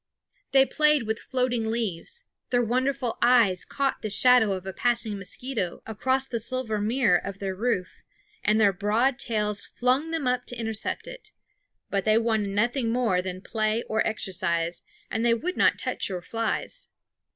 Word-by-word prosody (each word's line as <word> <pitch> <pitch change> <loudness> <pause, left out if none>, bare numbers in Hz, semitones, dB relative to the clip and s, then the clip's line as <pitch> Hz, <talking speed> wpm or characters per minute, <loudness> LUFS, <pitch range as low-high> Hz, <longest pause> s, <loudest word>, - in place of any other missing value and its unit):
They 270 0 +6
played 300 -2 +3
with 220 0 -2
floating 250 -3 -1
leaves; 225 - -3 0.3
their 245 -1 +2
wonderful 255 +1 -1
eyes 235 -7 +4
caught 275 -1 -2
the 215 - -3
shadow 235 0 +5
of 185 -1 -5
a 190 - -5
passing 235 -2 0
mosquito 200 0 -3
across 260 +5 0
the 235 - -3
silver 230 -1 -2
mirror 215 -4 +3
of 200 -1 -6
their 195 -1 -3
roof, 200 -2 -2 0.4
and 215 +1 +3
their 200 -2 +5
broad 225 +8 +1
tails 210 -4 0
flung 255 +6 0
them 325 -4 -2
up 250 0 0
to 245 - -5
intercept 225 -2 -3
it; - - -9 0.6
but 200 -1 0
they 215 +2 +4
wanted 220 -3 +1
nothing 230 +4 0
more 230 -7 +1
than 185 0 -6
play 220 +1 0
or 220 0 -1
exercise, 180 -5 -1 0.3
and 225 - -1
they 235 -1 +4
would 355 +10 -3
not - - +3
touch - - -2
your 180 -2 -4
flies. 230 - -3
225 Hz, 165 wpm, -26 LUFS, 205-250 Hz, 0.6 s, They